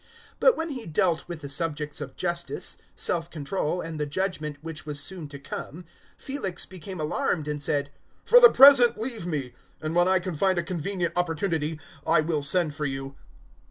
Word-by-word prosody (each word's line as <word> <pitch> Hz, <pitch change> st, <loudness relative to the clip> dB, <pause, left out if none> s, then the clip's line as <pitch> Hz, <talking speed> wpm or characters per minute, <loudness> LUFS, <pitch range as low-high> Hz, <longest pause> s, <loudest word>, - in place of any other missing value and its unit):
024:025 -, -, -29 dB, 0.3 s
But -, -, +5 dB
when 325 Hz, +1 st, -2 dB
he 250 Hz, -5 st, -6 dB
dealt 165 Hz, +1 st, +1 dB
with 170 Hz, -3 st, -7 dB
the 140 Hz, -, -7 dB
subjects 150 Hz, 0 st, -2 dB
of 135 Hz, -2 st, -7 dB
justice, 175 Hz, -1 st, -3 dB, 0.2 s
self 170 Hz, -1 st, 0 dB
control, 165 Hz, +2 st, -2 dB
and 165 Hz, -2 st, -6 dB
the 150 Hz, -, -1 dB
judgement 155 Hz, -3 st, -3 dB
which 165 Hz, 0 st, -6 dB
was 150 Hz, -2 st, -2 dB
soon 180 Hz, -1 st, -2 dB
to 145 Hz, 0 st, -9 dB
come, 160 Hz, +4 st, -7 dB, 0.3 s
Felix 200 Hz, -11 st, -3 dB
became 185 Hz, 0 st, -7 dB
alarmed 155 Hz, +1 st, -1 dB
and 150 Hz, -1 st, -3 dB
said, 145 Hz, 0 st, -1 dB, 0.3 s
"For -, -, +8 dB
the 480 Hz, -1 st, +10 dB
present 265 Hz, -, +7 dB
leave 225 Hz, -6 st, -2 dB
me, 140 Hz, -7 st, -3 dB, 0.3 s
and 155 Hz, 0 st, -4 dB
when 175 Hz, +1 st, +4 dB
I 190 Hz, 0 st, +4 dB
can 185 Hz, 0 st, -3 dB
find 185 Hz, +4 st, +1 dB
a 170 Hz, -, +1 dB
convenient 175 Hz, 0 st, -2 dB
opportunity 165 Hz, -2 st, -1 dB, 0.3 s
I 165 Hz, -1 st, +5 dB
will 155 Hz, -1 st, -1 dB
send 155 Hz, +2 st, +1 dB
for 150 Hz, 0 st, -2 dB
you." 135 Hz, 0 st, -5 dB
165 Hz, 190 wpm, -26 LUFS, 150-185 Hz, 0.3 s, the